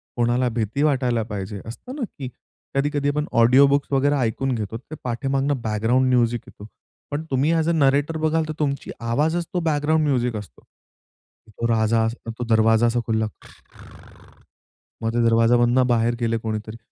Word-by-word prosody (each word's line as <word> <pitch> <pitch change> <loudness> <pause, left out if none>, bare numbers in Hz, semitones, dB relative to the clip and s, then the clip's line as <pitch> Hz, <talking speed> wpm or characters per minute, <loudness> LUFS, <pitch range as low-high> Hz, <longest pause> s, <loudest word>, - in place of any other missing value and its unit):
कोणाला 120 +1 +1
भीती 115 +4 -1
वाटायला 125 -6 +1
पाहिजे 105 -1 -6
असतं 185 - -9
ना 295 - -6 0.2
की 135 - -4 0.5
कधी-कधी 145 +1 0
आपण 150 +1 -1 0.2
ऑडिओ 125 +4 +6
बुक्स 140 0 +1
वगैरे 140 +1 +2
ऐकून 130 +1 -1
घेतो 110 0 -4
ते 140 +6 -11
पाठीमागून 135 +3 -1
बॅकग्राउंड 115 +4 +1
म्युझिक 120 -1 +2
येतो. 105 - -12 0.4
पण 145 +2 -2
तुम्ही 140 +5 +2
ऍज 160 0 +1
अ - - +3
नरेटर 145 0 +2
बघाल 160 +1 +1
तर 155 - -4
तुमची 140 -2 -2
आवाजच 150 +9 0
तो 180 - +1
बॅकग्राउंड 155 +1 +1
म्युझिक 125 -4 0
असतो. 105 - -9 0.9
तो 115 +2 -3
राजा 115 0 +2
असतो. 115 0 -5
तो 120 - -1
दरवाजा 110 +1 +4
असा 120 +1 +1
खुलला. 110 -1 0
खूर - - -19 0.6
मग 115 0 -1
ते 120 0 +1
दरवाजामधनं 120 +2 +4
बाहेर 120 0 +2
गेले 115 -1 0
कोणीतरी. 110 0 -5
120 Hz, 165 wpm, -22 LUFS, 115-145 Hz, 0.9 s, ऑडिओ